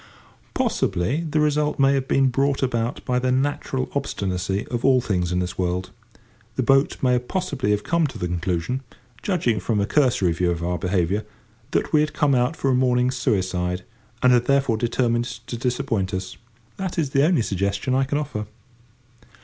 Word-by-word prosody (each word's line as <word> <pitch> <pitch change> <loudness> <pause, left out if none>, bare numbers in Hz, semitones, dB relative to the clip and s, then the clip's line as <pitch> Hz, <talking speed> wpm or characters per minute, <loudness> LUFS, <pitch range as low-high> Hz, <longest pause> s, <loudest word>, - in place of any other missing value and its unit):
Possibly 115 - 0
the 155 - +1
result 150 0 +1
may 135 0 +4
have 135 -1 -1
been 135 -1 +3
brought 135 +2 +1
about 120 -2 -1
by 125 0 +1
the 130 0 0
natural 130 -1 -1
obstinacy 95 -8 -2
of 120 -1 -3
all 130 -1 +5
things 90 -7 -1
in 90 - 0
this 90 +1 -3
world. 90 0 -1 0.6
The - - 0
boat 135 +1 +3
may 125 -1 +4
possibly 140 - -2
have 105 0 +1
come 170 -2 +1
to 130 -4 -9
the 90 - -2
conclusion, 90 +7 -2 0.4
judging 140 - 0
from 105 +3 0
a 100 - +2
cursory 125 - +2
view 85 +2 0
of 85 -1 -2
our 90 +1 -1
behaviour, 95 +2 0 0.5
that - - -1
we 155 - +6
had 155 0 -1
come 150 -2 +2
out 125 +5 +2
for 135 - 0
a - - +3
morning's 125 0 +2
suicide, 90 -6 -1 0.4
and 125 0 +6
had 120 -1 +3
thereupon 135 -5 +2
determined 120 0 +1 0.2
to 120 - -5
disappoint 120 -6 -1
us. 95 0 -5 0.4
That 190 -2 -4
is 150 -5 0
the 140 0 +3
only 155 -6 +3
suggestion 100 +5 -1
I 135 +1 +3
can 145 +2 -1
offer. 130 -8 -4
125 Hz, 180 wpm, -23 LUFS, 95-135 Hz, 0.6 s, we